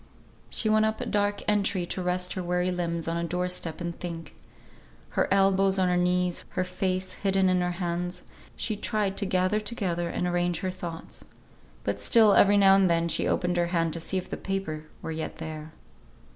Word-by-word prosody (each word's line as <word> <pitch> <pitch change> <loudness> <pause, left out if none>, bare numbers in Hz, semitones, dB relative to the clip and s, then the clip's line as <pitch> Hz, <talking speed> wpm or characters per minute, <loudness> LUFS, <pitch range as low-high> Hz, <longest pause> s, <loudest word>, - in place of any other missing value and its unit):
She 220 - -2
went 215 0 +4
up 220 0 -2
a - - -3
dark 205 0 0
entry 200 -3 +1
to 185 - -4
rest 180 0 -1
her 185 - -3
weary 180 +1 0
limbs 170 -2 -2
on 165 0 -1
a 170 - -1
door 180 +2 -1
step 170 -3 -4
and 170 -1 -4
think. 165 -3 -6 0.8
Her - - 0
elbows 195 0 +3
on 185 -1 +2
her 180 - +2
knees, 180 0 +1
her 185 - +3
face 185 0 -2
hidden 195 -1 +1
in 180 -1 +2
her 180 - 0
hands, 175 0 -3 0.3
she 220 - -2
tried 210 -2 -1
to 200 - +1
gather 185 +3 +1
together 190 -6 -2
and 180 - -2
arrange 175 -1 0
her 185 - -1
thoughts. 170 -3 -8 0.6
But - - -2
still 220 -3 +6
every 205 +1 +6
now 195 -1 +7
and 195 -2 +4
then 170 0 +2
she - - +1
opened 180 0 0
her 175 0 +2
hand 165 -2 0
to 165 - -3
see 190 +3 -2
if 185 - -3
the - - -5
paper 190 -6 -4 0.2
were - - -4
yet 160 0 -4
there. 155 -1 -7
180 Hz, 200 wpm, -27 LUFS, 170-195 Hz, 0.8 s, now